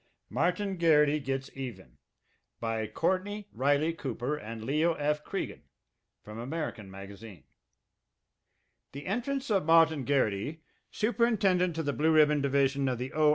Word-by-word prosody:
MARTIN 180 - 0
GARRITY 150 -3 +4
GETS 135 -1 -3
EVEN 130 -3 -8 0.6
By 115 -1 -2
COURTNEY 200 - -1
RYLEY 145 +4 +2
COOPER 135 -2 -3
and 115 -4 -7
LEO. 155 +6 +2
F. 150 0 -1
CREAGAN - - -4 0.6
From 105 +1 -9
American 125 -6 -4
Magazine 95 -2 -10 1.5
The 140 +1 -8
entrance 250 +6 -2
of 195 -5 +3
Martin 160 -2 +5
Garrity, 140 +3 0 0.3
superintendent 205 -7 +1
of 160 - -2
the 145 - 0
Blue 155 +3 +2
Ribbon 150 -1 +5
Division 140 0 +2
of 125 - -1
the 125 +2 -5
O. 155 -1 +4
150 Hz, 130 wpm, -30 LUFS, 130-170 Hz, 1.5 s, Martin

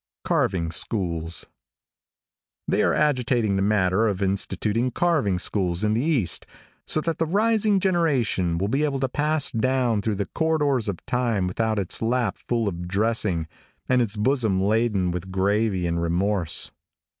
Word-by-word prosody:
CARVING 85 -4 0
SCHOOLS. 85 -5 -1 1.2
|THEY - - +1
are - - +2
agitating 125 -7 +1
the 95 - 0
matter 100 +1 +2
of 100 -2 -1
instituting 105 +5 -1
carving 135 - +1
schools 90 0 -1
in 105 0 +2
the 115 - +1
east, 135 - 0 0.4
so 155 - +3
that 165 0 -3
the 165 - +1
rising 210 +2 +2
generation 140 - +1
will 95 +3 -1
be 135 +8 0
able 140 -3 0
to 135 - 0
pass 150 +2 0
down 120 -2 +1
through 105 0 -1
the 100 0 -2
corridors 145 - 0
of 95 - -6
time 120 -6 0
without 110 +4 -1
its 95 -3 -1
lap 115 -3 0
full 115 -3 0
of 90 -2 -4
dressing 100 -4 0 0.4
and 125 -1 +3
its 110 -3 -1
bosom 110 -4 +1
laden 105 -2 +1
with 90 +1 -5
gravy 95 0 0
and 85 0 -1
remorse. 85 +1 -1
110 Hz, 155 wpm, -24 LUFS, 95-130 Hz, 1.2 s, so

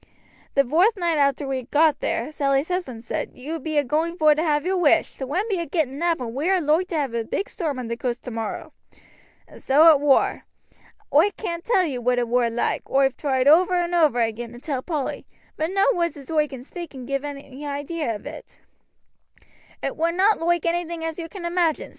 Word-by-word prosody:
The 275 - +5
vorth 345 - +3
noight 340 -4 0
arter 280 +1 0
we 265 -1 -2
got 305 0 +3
there 245 +6 -2
Sally's 275 +1 0
husband 305 -11 -3
said: - - -4
'You 310 +6 -5
be 310 +1 -3
a 290 - +4
going 320 +6 -1
vor 310 -2 +5
to 305 - -1
have 300 -2 +1
your 380 +1 +1
wish; 330 -1 +2
the 265 - -5
wind 360 +10 -1
be 395 -5 -1
a 340 - -3
getting 295 -5 -1
up, 340 -2 +1
and 235 -3 -5
we 290 +8 -1
are 380 -1 +3
loike 320 +3 +1
to 345 - -4
have 280 -6 -1
a 230 -1 -1
big 395 - -3
storm 315 -9 -3
on 250 -2 -5
the 235 - -3
coast 240 0 -4
tomorrow.' 225 -3 -5 0.7
And - - -15
so 310 +5 +6
it 295 - +4
war. 285 -2 +2 0.7
Oi 315 +8 +6
can't 340 -5 -4
tell 385 -6 +2
you 260 -6 -3
what 250 +1 +1
it 240 -1 0
war 240 0 +2
loike, 230 +1 -2
oi've 270 -1 +2
tried 265 -2 0
over 360 +5 +5
and 350 0 0
over 310 -8 +3
again 230 +1 -2
to 240 - -10
tell 270 -1 -3
Polly, 300 -3 -4 0.3
but 315 +1 -1
no 390 +1 +2
words 340 -2 -1
as 280 +1 -10
oi 305 -1 +2
can 265 -3 -9
speak 340 +4 -8
can 260 -3 -9
give 275 +1 -2
any 280 -1 -8
idee 290 +3 -4
of 230 -8 -3
it. - - -10 1.2
"It - - -2
war 330 +2 +1
not 390 +5 +3
loike 345 0 +1
anything 340 -1 -2
as 325 +1 -4
you 330 -1 -6
can 360 0 -8
imagine. 340 -2 0
300 Hz, 220 wpm, -23 LUFS, 265-340 Hz, 1.2 s, so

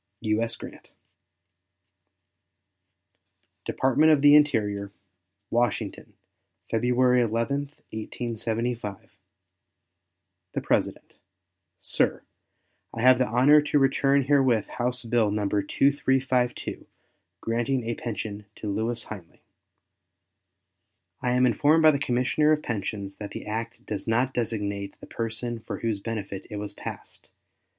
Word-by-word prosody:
U.S. 115 +1 0
GRANT. - - -11 2.8
DEPARTMENT 145 +5 +3
OF 150 -3 +4
THE 145 0 +8
INTERIOR, 105 -9 +2 0.6
Washington, 120 +1 -1 0.6
February 125 +2 +3
11, 115 +4 0 0.3
1875. 115 -1 -4 1.4
The - - -2
PRESIDENT. - - -1 0.6
SIR: - - 0 0.7
I 115 - -5
have 130 0 +7
the 130 - +2
honor 130 +7 +5
to 150 0 +1
return 135 0 +3
herewith 130 -5 +3 0.2
House 125 +1 -1
bill 115 -2 +2
No. 105 0 -1
2352, 130 +4 0 0.5
"granting 120 +2 -1
a 120 - 0
pension 105 -3 -5
to 105 - -4
Lewis 115 +2 -1
Hinely." 95 -6 -11 1.8
I 125 -1 +1
am 125 0 +4
informed 145 +7 +3
by 155 - +8
the 140 - -1
Commissioner 130 +4 +2
of 150 0 +2
Pensions 100 -3 -4
that 105 -1 -6
the - - -7
act 115 +2 -5
does 105 +1 -4
not 120 +4 +1
designate 100 -4 -3
the - - -11
person 115 +1 -4
for - - -7
whose 110 -3 -1
benefit 100 -3 -5
it 105 - -6
was 105 0 -5
passed. - - -9
115 Hz, 110 wpm, -26 LUFS, 110-130 Hz, 2.8 s, THE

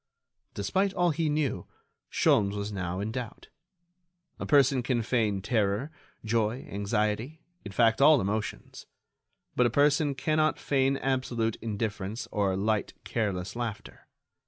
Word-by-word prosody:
Despite 190 - 0
all 175 -1 +3
he 160 0 0
knew, 145 - -1 0.4
Sholmes 100 -1 +2
was 100 +1 -3
now 95 -2 -3
in 105 +2 -3
doubt. 120 -2 -7 0.9
A - - -4
person 135 -2 +4
can 120 -1 0
feign 110 -5 0
terror, 110 +5 0 0.3
joy, 110 +2 0
anxiety, 105 +8 -1 0.2
in 100 - -7
fact 115 +3 +3
all 150 0 +7
emotions; 105 +1 -4 0.7
but 125 - +4
a - - 0
person 145 +3 +2
cannot 155 +3 +1
feign 135 -1 +1
absolute 125 -4 -1
indifference 110 0 -3
or 100 -3 0
light, 105 +1 -1
careless 100 -4 -2
laughter. 115 -3 -6
115 Hz, 130 wpm, -28 LUFS, 105-135 Hz, 0.9 s, all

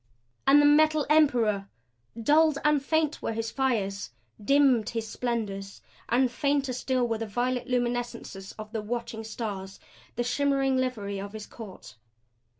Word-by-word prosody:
And 280 +2 +7
the 290 - +5
Metal 310 +1 +4
Emperor! 230 -10 +3 0.5
Dulled 300 +5 +4
and 300 -2 +3
faint 315 +1 0
were - - -2
his 225 0 -3
fires, 205 - -1 0.3
dimmed 265 -3 +4
his 225 -1 -3
splendors; 210 -5 -4 0.3
and 250 +1 +3
fainter 280 0 0
still 255 0 0
were 225 -1 -2
the 225 - -3
violet 245 +3 -1
luminescences 240 -5 -3
of 215 -1 -8
the 225 -2 -3
watching 225 0 -4
Stars, 205 -4 -6 0.4
the 240 - 0
shimmering 270 +1 +1
livery 215 -6 -2
of 200 +1 -7
his 215 -1 -7
court. 190 - -11
240 Hz, 145 wpm, -27 LUFS, 215-275 Hz, 0.5 s, And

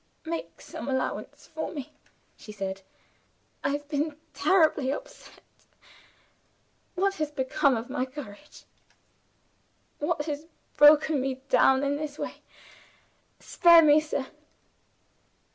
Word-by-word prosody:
"Make 330 +1 -5
some - - -8
allowance 260 -1 -3
for 315 - -4
me," 295 -1 -8 0.4
she 215 - -12
said. 195 -2 -5 0.8
"I - - +1
have 290 +1 -3
been 295 +1 -2 0.2
terribly 315 -8 +2
upset. - - -9 1.5
What 390 +2 +1
has 305 -1 -1
become 265 -2 +1
of 225 +2 -6
my 260 0 -2
courage? 265 0 -11 1.4
What 295 0 -1
has 300 0 -5 0.3
broken 295 -1 +6
me 265 0 -2
down 265 +1 +4
in 285 0 0
this 300 -1 -6
way? - - -6 1.0
Spare 340 -2 +6
me, 300 0 +6
sir." 300 -3 -3
290 Hz, 110 wpm, -27 LUFS, 265-310 Hz, 1.5 s, broken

